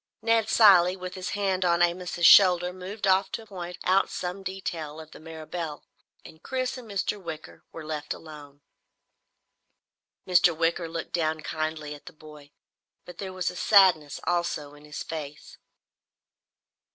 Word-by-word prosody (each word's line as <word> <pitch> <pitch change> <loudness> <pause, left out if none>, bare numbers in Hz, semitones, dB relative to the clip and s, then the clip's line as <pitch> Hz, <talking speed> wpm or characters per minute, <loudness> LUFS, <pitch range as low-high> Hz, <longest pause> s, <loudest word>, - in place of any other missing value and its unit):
Ned 225 -1 +2
Cilley, 190 -5 +6
with 180 0 -7
his 185 -1 -5
hand 190 -2 0
on 175 -1 +3
Amos's 175 0 -1
shoulder, 180 -1 +7
moved 190 +3 -6
off 190 0 +3
to 225 - -5
point 180 -4 -8
out 190 +1 +2
some 180 +2 -5
detail 170 -5 -6
of 155 -1 -12
the - - -12
Mirabelle, 160 -1 -7 0.4
and 160 0 -14
Chris 255 -1 -3
and 245 -4 -10
Mr. 200 0 -2
Wicker 160 -3 -9
were 160 -2 -9
left 155 -1 -5
alone. 145 -3 -9 1.7
Mr. 175 -2 +4
Wicker 165 0 0
looked 165 0 -6
down 155 -2 -1
kindly 155 -1 -4
at 145 +3 -14
the 180 - -10
boy, 150 -2 -15 0.6
but 180 -1 -12
there 190 -1 -5
was 185 -2 -2
a - - -13
sadness 180 -8 +4
also 170 -4 -2
in 145 0 -16
his 150 - -7
face. 150 -3 -8
175 Hz, 150 wpm, -26 LUFS, 155-190 Hz, 1.7 s, shoulder